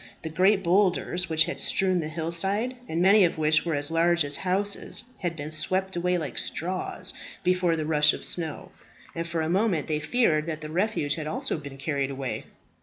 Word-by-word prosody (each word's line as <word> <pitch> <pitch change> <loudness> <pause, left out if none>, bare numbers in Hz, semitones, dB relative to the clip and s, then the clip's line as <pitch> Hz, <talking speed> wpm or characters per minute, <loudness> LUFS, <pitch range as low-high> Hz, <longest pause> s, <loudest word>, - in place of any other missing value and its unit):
The 160 - -4
great 190 +5 +3
bowlders 180 -1 +2
which 160 -1 +4
had - - -4
strewn 185 -2 +2
the 155 - -3
hill 160 +1 -4
side, 200 +9 -1
and 165 +2 0
many 200 +2 +6
of 170 - +1
which 155 0 +3
were 165 -3 -1
as 145 +2 -1
large 170 -1 +3
as 145 0 0
houses, 195 +2 -1 0.2
had 175 -3 -2
been 150 -1 -6
swept 185 +5 0
away 180 +1 +1
like 150 -7 -3
straws 185 +3 -2 0.3
before 180 -2 +2
the 155 -1 -2
rush 150 -1 +4
of - - -4
snow, 160 -4 -3 0.4
and 165 0 -4
for 170 -1 -2
a 160 - -1
moment 185 -2 +1
they 150 -1 -1
feared 155 -5 +1
that 155 -1 -4
the 155 0 -7
refuge 180 -5 0
had 155 -1 -4
also 155 - -2
been 140 -2 -9
carried 140 -1 -1
away. 135 -1 -4
165 Hz, 200 wpm, -26 LUFS, 155-185 Hz, 0.4 s, many